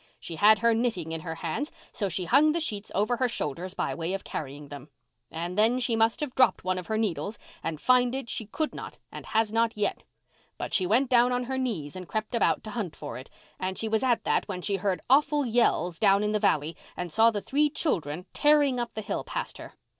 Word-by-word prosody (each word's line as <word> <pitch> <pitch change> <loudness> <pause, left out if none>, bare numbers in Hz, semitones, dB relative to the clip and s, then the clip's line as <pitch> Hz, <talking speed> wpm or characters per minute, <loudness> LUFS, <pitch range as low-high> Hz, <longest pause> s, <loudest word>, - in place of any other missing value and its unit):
She 165 - -7
had 215 +4 +7
her 230 - +6
knitting 220 -9 -1
in 165 0 -4
her 160 0 -5
hands 170 - -3 0.2
so 200 -3 -2
she 180 +1 -3
hung 295 - +5
the 340 - 0
sheets 215 -10 -3
over 215 +5 +1
her 255 - +2
shoulders 180 - -4
by - - -1
way 170 +2 -3
of 195 - -6
carrying 145 0 -6
them. 145 0 -9 0.4
And 170 +2 -4
then 225 +5 +3
she 245 -2 +1
must 225 +3 +2
have 290 -4 -3
dropped 260 - +3
one 185 0 0
of 180 - -9
her 220 - -1
needles 205 -1 -2 0.2
and 160 -2 -4
find 250 +2 +3
it 270 -3 -4
she 225 -2 -4
could 310 +8 -2
not - - -8
and - - -9
has 220 -1 +1
not 230 0 +1
yet. 210 - -1 0.6
But - - -5
she 185 -3 +2
went 245 +7 +2
down 245 0 +5
on 250 0 0
her 260 +2 -3
knees 190 - -3
and 185 -1 -8
crept 215 +2 -3
about 235 - +2
to 215 - -7
hunt 205 -8 -4
for 145 - -7
it, 130 - -12 0.3
and 185 0 -2
she 225 - +1
was 220 0 +1
at 245 -3 +2
that - - +1
when 185 -3 -5
she 200 -1 0
heard 190 -1 -1
awful 290 +2 +4
yells 220 -7 +1
down 200 -1 +4
in 210 - 0
the 215 - +1
valley 160 -6 +1 0.2
and 180 -2 -4
saw 225 +4 +5
the 215 -2 -2
three 295 +8 +1
children 180 - -2
tearing 290 -4 +4
up 240 -1 -4
the 215 - -3
hill 205 - -3
past - - -5
her. - - -10
215 Hz, 235 wpm, -27 LUFS, 180-245 Hz, 0.6 s, had